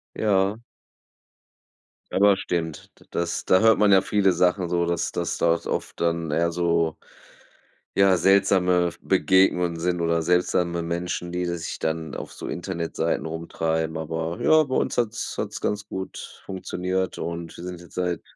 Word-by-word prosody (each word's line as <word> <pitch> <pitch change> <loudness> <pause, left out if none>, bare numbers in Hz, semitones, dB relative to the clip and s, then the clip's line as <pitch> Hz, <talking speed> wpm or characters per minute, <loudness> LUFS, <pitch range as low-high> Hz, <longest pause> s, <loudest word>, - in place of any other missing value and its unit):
Ja. 100 +1 +1 1.5
Aber 100 0 +5
stimmt. 80 -4 -4
D - - -20
das 85 0 -2
da 95 - +4
hört 110 0 +5
man 105 -2 +5
ja 95 0 +6
viele 100 -3 +2
Sachen 90 0 +1
so, 85 0 +1
dass 85 0 -1
das - - -2
dort 85 0 +1
oft - - -4
dann 85 -2 0
eher 85 +2 +2
so, 85 -2 0 1.0
ja 95 -2 +5
seltsame 90 -3 +3
V - - -17
Begegnungen 90 -1 +3
sind 90 0 0
oder 85 -1 +1
seltsame 90 0 +1
Menschen, 85 +1 -3
die 90 0 -2
sich 85 -1 -4
dann 80 -1 -3
auf - - -7
so - - -8
Internetseiten 85 -2 -2
rumtreiben. 80 0 -2
Aber 80 +1 -3
ja, 155 0 +5
bei 130 -2 -3
uns - - 0
hat's 120 -1 -1
hat's - - -4
ganz 105 0 -2
gut 95 0 -7
funktioniert 95 0 -3
und 85 0 -5
wir 85 - -9
sind 90 -1 -7
jetzt 85 - -16
seit 90 -2 -1
90 Hz, 155 wpm, -24 LUFS, 85-95 Hz, 1.5 s, ja